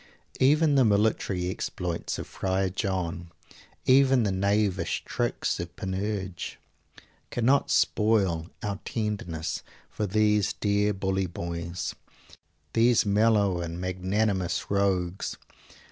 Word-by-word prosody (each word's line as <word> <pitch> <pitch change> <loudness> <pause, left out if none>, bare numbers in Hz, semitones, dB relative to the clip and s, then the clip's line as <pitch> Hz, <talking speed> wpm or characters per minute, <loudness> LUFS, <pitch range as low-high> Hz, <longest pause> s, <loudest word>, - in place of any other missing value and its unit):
Even 150 +3 +4
the 135 -2 +5
military 100 -4 +1
exploits 90 -2 -3
of - - -5
Friar 95 0 -1
John, 90 -3 -2 0.6
even 130 -1 +5
the 100 - +1
knavish 100 +1 0
tricks - - -1
of - - -6
Panurge, 95 -1 -4 0.7
cannot 130 +4 +2
spoil 95 -6 +2
our 100 -2 -2
tenderness 100 -8 -3 0.3
for 105 - -2
these 105 0 +2
dear 105 0 +1
bully 95 -1 -1
boys, 85 -2 -4 0.8
these 115 0 +4
mellow 100 -3 +3
and 85 0 -5
magnanimous 95 +1 -1
rogues! 95 -2 0
100 Hz, 100 wpm, -27 LUFS, 90-110 Hz, 0.8 s, the